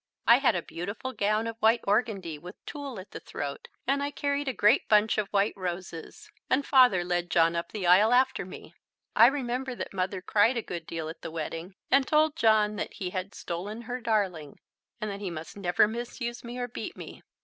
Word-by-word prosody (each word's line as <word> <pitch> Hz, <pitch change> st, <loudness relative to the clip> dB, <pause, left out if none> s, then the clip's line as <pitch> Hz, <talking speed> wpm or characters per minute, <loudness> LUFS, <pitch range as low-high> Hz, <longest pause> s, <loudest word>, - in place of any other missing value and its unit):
I 235 Hz, +2 st, +7 dB
had 260 Hz, -7 st, +3 dB
a 175 Hz, -, -2 dB
beautiful 200 Hz, +9 st, -5 dB
gown 215 Hz, 0 st, +1 dB
of 230 Hz, 0 st, -5 dB
white 225 Hz, +2 st, +4 dB
organdie 195 Hz, -7 st, 0 dB
with 180 Hz, +5 st, -10 dB
tulle 280 Hz, -7 st, -6 dB
at 185 Hz, -, -11 dB
the -, -, -7 dB
throat, 140 Hz, -1 st, -6 dB, 0.2 s
and 275 Hz, +2 st, +1 dB
I 285 Hz, -, -1 dB
carried 285 Hz, 0 st, -2 dB
a -, -, +2 dB
great 215 Hz, +2 st, +3 dB
bunch 215 Hz, 0 st, +4 dB
of 210 Hz, -, -1 dB
white 200 Hz, +1 st, +1 dB
roses, 175 Hz, -3 st, -6 dB, 0.2 s
and 275 Hz, +2 st, +2 dB
Father 250 Hz, -10 st, +5 dB
led 175 Hz, 0 st, -1 dB
John 165 Hz, 0 st, +3 dB
up 170 Hz, -, -3 dB
the 205 Hz, -4 st, -4 dB
aisle 190 Hz, +6 st, +6 dB
after 255 Hz, -3 st, +3 dB
me. 185 Hz, -, -11 dB, 0.4 s
I 230 Hz, -, +8 dB
remember 255 Hz, -1 st, -2 dB
that -, -, -6 dB
Mother 185 Hz, 0 st, -2 dB
cried 220 Hz, +6 st, +3 dB
a 230 Hz, -, -2 dB
good 170 Hz, -2 st, -6 dB
deal 160 Hz, -1 st, -4 dB
at 165 Hz, +1 st, -8 dB
the -, -, -5 dB
wedding, 165 Hz, +3 st, -5 dB, 0.2 s
and 270 Hz, -1 st, +4 dB
told 310 Hz, 0 st, +3 dB
John 215 Hz, -6 st, +3 dB
that -, -, -4 dB
he 185 Hz, -4 st, -4 dB
had 185 Hz, +2 st, -4 dB
stolen 205 Hz, +7 st, -5 dB
her 245 Hz, +2 st, -5 dB
darling 190 Hz, -10 st, -1 dB, 0.4 s
and 215 Hz, -2 st, -3 dB
that 200 Hz, -, -6 dB
he 200 Hz, -2 st, -4 dB
must 165 Hz, -1 st, -7 dB
never 190 Hz, 0 st, +3 dB
misuse 240 Hz, +1 st, -5 dB
me 240 Hz, +1 st, -7 dB
or 245 Hz, 0 st, -2 dB
beat 240 Hz, -, -7 dB
me. -, -, -9 dB
210 Hz, 210 wpm, -28 LUFS, 180-245 Hz, 0.4 s, I